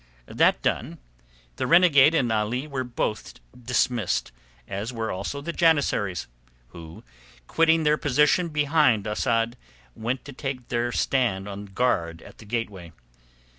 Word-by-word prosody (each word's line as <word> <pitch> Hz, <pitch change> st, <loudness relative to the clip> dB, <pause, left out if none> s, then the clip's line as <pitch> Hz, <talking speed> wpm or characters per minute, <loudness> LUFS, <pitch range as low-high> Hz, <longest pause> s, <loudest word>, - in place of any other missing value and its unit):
That -, -, +2 dB
done, -, -, -1 dB, 0.6 s
the -, -, -2 dB
renegade 165 Hz, -3 st, +6 dB
and 125 Hz, -7 st, +1 dB
Ali 110 Hz, +5 st, -1 dB
were 140 Hz, -4 st, -4 dB
both 120 Hz, -3 st, -4 dB, 0.2 s
dismissed, 120 Hz, -, -1 dB, 0.4 s
as 100 Hz, +5 st, -4 dB
were 115 Hz, -2 st, -3 dB
also 100 Hz, +10 st, -4 dB
the 170 Hz, +4 st, -5 dB
janissaries, 145 Hz, -, +1 dB, 0.4 s
who, 80 Hz, +3 st, -12 dB, 0.4 s
quitting 165 Hz, -, +3 dB
their 150 Hz, 0 st, +3 dB
position 150 Hz, +5 st, +2 dB
behind 145 Hz, -7 st, +2 dB
Asad, 115 Hz, +2 st, 0 dB, 0.4 s
went 120 Hz, +4 st, -4 dB
to 140 Hz, -, -9 dB
take 130 Hz, -2 st, -6 dB
their 120 Hz, 0 st, -1 dB
stand 115 Hz, -8 st, 0 dB
on 100 Hz, 0 st, -7 dB
guard 95 Hz, -6 st, -1 dB
at -, -, -15 dB
the 110 Hz, -, -12 dB
gateway. 100 Hz, -7 st, -5 dB
120 Hz, 130 wpm, -25 LUFS, 105-145 Hz, 0.6 s, renegade